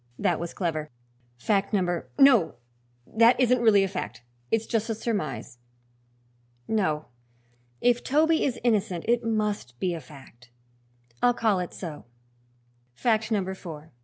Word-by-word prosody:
That 180 -5 +1
was 170 0 -5
clever. 155 -4 -2 0.5
Fact 200 - 0
number 175 -4 0
No! 270 - +5 0.5
that 230 - +4
isn't 250 -1 +3
really 210 -4 +5
a - - +1
fact; 115 - -6 0.3
it's 225 0 +1
just 225 -1 -1
a 225 - -1
surmise. 190 - -4 1.1
No, 155 -9 0 0.8
if 245 0 +2
Toby 315 +3 +3
is 255 -3 0
innocent 205 -7 0
it 240 +1 +2
must 210 - -2
be 180 -2 0
a 165 - -5
fact. 125 -3 -16 0.7
I'll 245 -1 +4
call 215 -5 +2
it 180 - -4
so 160 -5 -8 0.9
Fact 220 - +1
number 190 -3 0
four." 160 -4 -10
200 Hz, 135 wpm, -26 LUFS, 165-230 Hz, 1.1 s, No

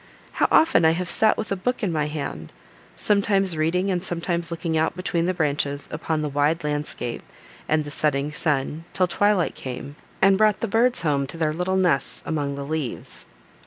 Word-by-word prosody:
How - - +2
often 320 - +5
I 160 0 +5
have 175 +1 -2
sat 220 -1 +4
with 215 - -4
a - - +2
book 250 +6 -2
in 190 - +1
my 150 -2 0
hand, 140 - -5 0.4
sometimes 195 -3 +2
reading, 180 +5 +1
and 180 -1 -1
sometimes 170 -1 -1
looking 165 -1 -2
out 160 +1 +1
between 175 -2 -1
the 185 - +1
branches 145 -2 -1
upon 155 0 -2
the - - -1
wide 145 +4 +1
landscape, 145 -5 -3 0.5
and 155 -1 +2
the 145 - -7
setting 145 0 0
sun, 150 +1 -1
till 185 - +3
twilight 205 0 +1
came, 135 +2 -7 0.2
and 195 0 +4
brought 215 -1 +3
the 230 - 0
birds 235 +3 +2
home 140 -3 +1
to 165 - -7
their 155 -2 0
little 180 +3 -1
nests 175 -7 +1
among 145 -3 -2
the 140 0 -5
leaves! 150 -4 -5
160 Hz, 190 wpm, -24 LUFS, 150-185 Hz, 0.5 s, often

